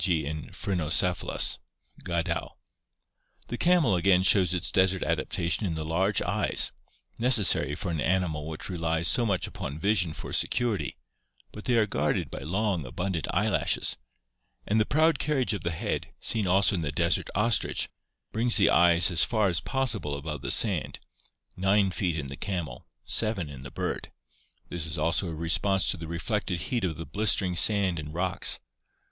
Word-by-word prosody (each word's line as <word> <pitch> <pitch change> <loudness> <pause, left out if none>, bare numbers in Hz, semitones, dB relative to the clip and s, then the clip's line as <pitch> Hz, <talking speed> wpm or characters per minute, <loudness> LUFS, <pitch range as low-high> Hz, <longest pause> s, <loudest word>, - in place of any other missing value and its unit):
g., 80 -5 +2
in 75 +1 -5
Phrynocephalus" 90 -1 0 0.4
(Gadow). 85 -2 -2 0.9
The 120 - -3
camel 170 - +3
again 90 +1 +3
shows 95 -2 +4
its 90 -2 0
desert 95 0 +2
adaptation 85 +4 -1
in 85 - -2
the 80 0 -4
large 95 +5 +1
eyes, - - +2 0.5
necessary 110 - +4
for 90 +3 -4
an 80 -3 -2
animal 85 -4 0
which 80 -1 -6
relies 85 -2 -1
so 120 -2 +4
much 95 -3 0
upon 70 - -6
vision 90 -2 +1
for - - -8
security, 120 -5 0 0.5
but 105 - -10
they 125 - +2
are 110 - +4
guarded 75 -7 -1
by - - -6
long, 95 +3 -1
abundant 85 +5 -3
eyelashes, - - +1 0.7
and 110 +2 +1
the 110 - +2
proud 155 0 +3
carriage 135 -5 0
of 100 - -4
the 85 - -2
head, 80 -1 -3
seen 110 -4 -1
also 95 +3 +3
in 90 - -1
the 75 -2 -2
desert - - 0
ostrich, 110 +4 +1 0.4
brings 115 +2 +2
the 100 - +4
eyes 85 0 +5
as 85 - +4
far 110 -4 +2
as 85 -1 0
possible 115 - -1
above 75 -1 -6
the - - -4
sand - - +1 0.3
— - - -34
9 95 +1 +2
feet 90 -3 -1
in 75 - -3
the 70 0 -7
camel, 85 -10 -5 0.2
7 95 - -1
in 65 -2 -10
the 70 - -8
bird. - - -4 0.6
This 85 -2 -2
is 80 - -3
also 85 +4 +1
a 80 - -5
response 90 +4 +1
to - - -1
the 80 - -7
reflected 90 +2 -2
heat 110 +9 -2
of 80 -3 -3
the 80 - -6
blistering 100 -3 +1
sand 95 -2 +2
and 75 0 -7
rocks. 95 +3 0
90 Hz, 170 wpm, -27 LUFS, 80-105 Hz, 0.9 s, eyes